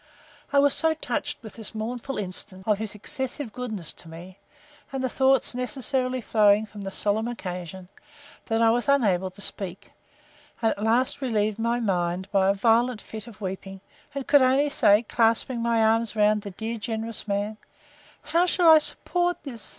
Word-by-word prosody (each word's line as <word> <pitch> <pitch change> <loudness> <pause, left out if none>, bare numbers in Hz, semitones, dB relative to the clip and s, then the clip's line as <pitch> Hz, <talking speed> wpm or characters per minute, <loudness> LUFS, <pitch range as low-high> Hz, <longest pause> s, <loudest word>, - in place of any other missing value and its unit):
I 285 - +2
was 285 0 +5
so 320 0 +2
touched 315 - -4
with 220 - -10
this 225 0 -9
mournful 240 +4 -4
instance 190 -1 -3
of 210 -2 +1
his 215 -2 -4
excessive 265 +2 -5
goodness 220 -10 -5
to 165 - -11
me, 180 +4 -11 0.5
and 270 -1 -3
the 260 - 0
thoughts 265 +1 +2
necessarily 255 +1 -1
flowing 210 -1 +3
from 210 -1 -11
the 195 - -4
solemn 210 +3 -1
occasion, 185 -4 -6 0.6
that 225 0 +1
I 225 - +5
was 245 +4 0
unable 195 -10 +2
to 195 +2 -12
speak; 190 -2 -2 0.7
and 225 -1 +2
at 200 - -5
last 245 +5 +1
relieved 215 -4 0
my 235 +1 0
mind 180 -3 -1
by 195 -1 +3
a - - +4
violent 230 +3 +2
fit 220 0 -9
of 220 -3 -13
weeping; 195 0 -6 0.4
and 275 -2 -3
could 285 -2 +5
only 270 +3 +3
say, 205 -2 +4
clasping 230 +2 +1
my 230 -1 +2
arms 225 0 +2
around 210 0 +3
the 200 - -7
dear 220 +4 -5
generous 225 0 -3
man, 205 +1 -2 0.7
How 335 +4 +2
shall 350 -1 +4
I 315 - +9
support 350 +3 -1
this! 235 -8 -7
225 Hz, 175 wpm, -25 LUFS, 200-255 Hz, 0.7 s, I